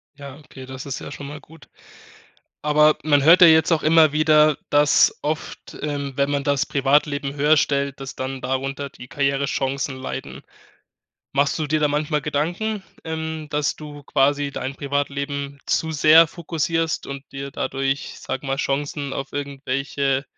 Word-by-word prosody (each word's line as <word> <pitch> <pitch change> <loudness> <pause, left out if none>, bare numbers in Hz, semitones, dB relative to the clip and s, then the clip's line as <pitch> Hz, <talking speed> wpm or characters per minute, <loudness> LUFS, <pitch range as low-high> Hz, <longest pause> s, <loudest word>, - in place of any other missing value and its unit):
Ja, 140 -1 -10
okay, 135 -3 -12
das 130 +1 -8
ist 140 0 -4
ja - - -8
schon 145 -1 -8
mal 150 +1 -8
gut. 160 +1 -18 0.9
Aber 150 0 +4
man 145 -3 +3
hört 170 +4 +7
ja 175 - +10
jetzt 160 +1 +5
auch 165 - +2
immer 155 -1 +5
wieder, 155 -1 +4
dass 145 0 +4
oft 155 +1 -5
ähm, 145 -2 -3
wenn 140 0 +1
man 140 -1 -1
das 140 -1 +1
Privatleben 140 0 +1
höherstellt, 140 -2 +1
dass 135 0 -7
dann 130 0 -4
darunter 135 +2 -3
die 125 - -13
Karrierechancen 135 -1 -1
leiden. 130 - -6 0.9
Machst 140 +1 +1
du 155 - -1
dir 155 +1 +1
da 150 - +3
manchmal 150 0 -1
Gedanken, 175 +9 -2 0.2
ähm, 160 -1 -4
dass 150 -1 0
du 150 -1 -10
quasi 140 +1 +1
dein 135 0 -5
Privatleben 140 0 -3
zu 160 - 0
sehr 155 +2 +7
fokussierst 165 0 -2
und 140 0 -7
dir 140 0 -6
dadurch, 135 0 -1
ich 140 - -9
sage 135 +1 -5
mal, 135 0 -1
Chancen 140 0 -2
auf 135 0 -5
irgendwelche, 140 -1 -2
145 Hz, 160 wpm, -22 LUFS, 140-150 Hz, 0.9 s, ja